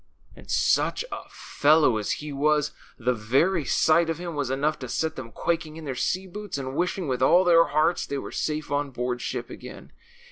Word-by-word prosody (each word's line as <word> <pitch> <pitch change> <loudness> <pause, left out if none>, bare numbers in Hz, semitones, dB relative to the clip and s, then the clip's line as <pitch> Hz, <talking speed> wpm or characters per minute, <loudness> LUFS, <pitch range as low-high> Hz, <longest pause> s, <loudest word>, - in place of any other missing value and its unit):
And - - -15
such - - +2
a - - -7
fellow 145 -5 +3
as 105 - -1
he 150 -1 -6
was! 150 +1 +2 0.3
The 125 0 +1
very 135 - +1
sight 160 +6 +3
of 165 - -1
him 175 -1 -5
was 145 -3 -2
enough 145 +4 0
to 130 - -7
set 160 +5 -1
them 120 -3 -8
quaking 160 +1 -2
in 160 - -8
their 135 - -3
sea 185 +8 -1
boots 205 -1 -6
and 135 -1 -5
wishing 180 0 -1
with 130 -2 -1
all 175 +7 +5
their 165 -2 +6
hearts 155 +4 +1
they 140 - -3
were - - -6
safe 150 -2 -3
on 145 0 0
board 125 -1 -3
ship - - -4
again. - - -10
150 Hz, 205 wpm, -26 LUFS, 130-165 Hz, 0.3 s, their